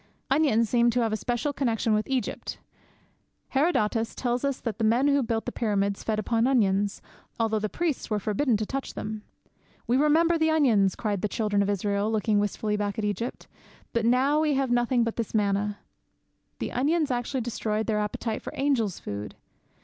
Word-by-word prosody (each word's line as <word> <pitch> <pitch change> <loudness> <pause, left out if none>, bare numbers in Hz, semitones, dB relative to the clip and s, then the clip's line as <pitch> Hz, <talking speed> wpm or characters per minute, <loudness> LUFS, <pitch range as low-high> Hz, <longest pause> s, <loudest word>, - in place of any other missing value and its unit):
"' - - -32
Onions 270 -6 +3
seem 235 +1 +3
to 245 +1 +1
have 225 -2 0
a - - +2
special 245 +5 -2
connexion 230 -5 0
with 215 0 0
Egypt. 260 -2 -2 0.9
Herodotus 230 -7 +1
tells 245 0 -1
us 275 -2 -1
that 230 -2 -4
the - - 0
men 235 +6 +3
who 280 -1 +3
built 225 -2 -1
the 245 - -3
Pyramids 200 -4 0
fed 220 -1 -1
upon 225 +3 +1
onions, 205 -6 +1 0.4
although 220 -1 +1
the 215 0 -2
priests 335 -1 -2
were 215 - +1
forbidden 215 +4 +1
to 215 - -2
touch 270 +4 -5
them. 215 0 -5 0.6
'We 245 - +2
remember 325 +4 +3
the 320 0 +3
onions!' 230 - +3
cried 205 -4 -2
the - - +1
children 210 -1 0
of 200 - 0
Israel, 205 +1 0
looking 215 -1 +2
wistfully 210 +1 -1
back 205 +1 -2
at 215 - -1
Egypt, 210 +4 -3 0.5
'but 235 - +1
now 260 +6 +3
we 305 -2 +2
have 265 -2 0
nothing 240 0 +2
but 230 -1 -3
this 230 -1 -3
manna!' 205 0 +1 0.8
The - - -4
onions 295 +3 +1
actually 245 +2 -1
destroyed 220 -2 -2
their 215 -2 0
appetite 215 +1 -3
for - - -7
angels' 265 - 0
food! 100 +1 -6
230 Hz, 190 wpm, -27 LUFS, 210-265 Hz, 0.9 s, Onions